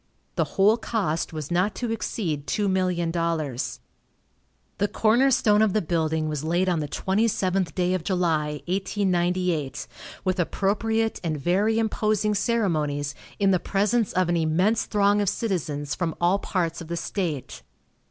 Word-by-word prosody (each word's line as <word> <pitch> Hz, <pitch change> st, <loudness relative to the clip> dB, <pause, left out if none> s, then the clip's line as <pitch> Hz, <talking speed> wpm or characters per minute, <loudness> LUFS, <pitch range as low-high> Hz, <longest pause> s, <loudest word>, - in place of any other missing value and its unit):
The -, -, -2 dB
whole 205 Hz, +4 st, +5 dB
cost 200 Hz, -9 st, -1 dB
was 155 Hz, -1 st, -6 dB
not 180 Hz, +4 st, +1 dB
to 240 Hz, -2 st, -3 dB
exceed 165 Hz, -10 st, -3 dB
$2,000,000. 170 Hz, -, -1 dB, 1.0 s
The 205 Hz, -, +2 dB
corner 225 Hz, +5 st, +3 dB
stone 210 Hz, -4 st, +4 dB
of 215 Hz, -3 st, +3 dB
the 215 Hz, -, +2 dB
building 160 Hz, -2 st, 0 dB
was 150 Hz, -1 st, -3 dB
laid 175 Hz, +4 st, +1 dB
on 175 Hz, -3 st, +1 dB
the 150 Hz, -, -2 dB
twenty 195 Hz, +9 st, +1 dB
seventh 190 Hz, -3 st, 0 dB
day 180 Hz, 0 st, +1 dB
of 185 Hz, -3 st, -1 dB
July, 160 Hz, -5 st, 0 dB
1898, 180 Hz, -5 st, 0 dB, 0.4 s
with 185 Hz, 0 st, 0 dB
appropriate 220 Hz, +5 st, 0 dB
and 155 Hz, -3 st, -2 dB
very 200 Hz, +8 st, +2 dB
imposing 215 Hz, -1 st, +1 dB
ceremonies, 155 Hz, -, 0 dB, 0.2 s
in 200 Hz, -1 st, +3 dB
the 185 Hz, -, +3 dB
presence 210 Hz, +4 st, +1 dB
of 185 Hz, -1 st, +2 dB
an 175 Hz, 0 st, +1 dB
immense 180 Hz, +8 st, +2 dB
throng 205 Hz, 0 st, +3 dB
of 200 Hz, -, +2 dB
citizens 155 Hz, -, -2 dB
from 165 Hz, -3 st, -2 dB
all 175 Hz, +3 st, +3 dB
parts 170 Hz, -5 st, -2 dB
of 165 Hz, -, -8 dB
the 170 Hz, +1 st, -3 dB
state. 170 Hz, -6 st, -3 dB
185 Hz, 150 wpm, -25 LUFS, 165-205 Hz, 1.0 s, whole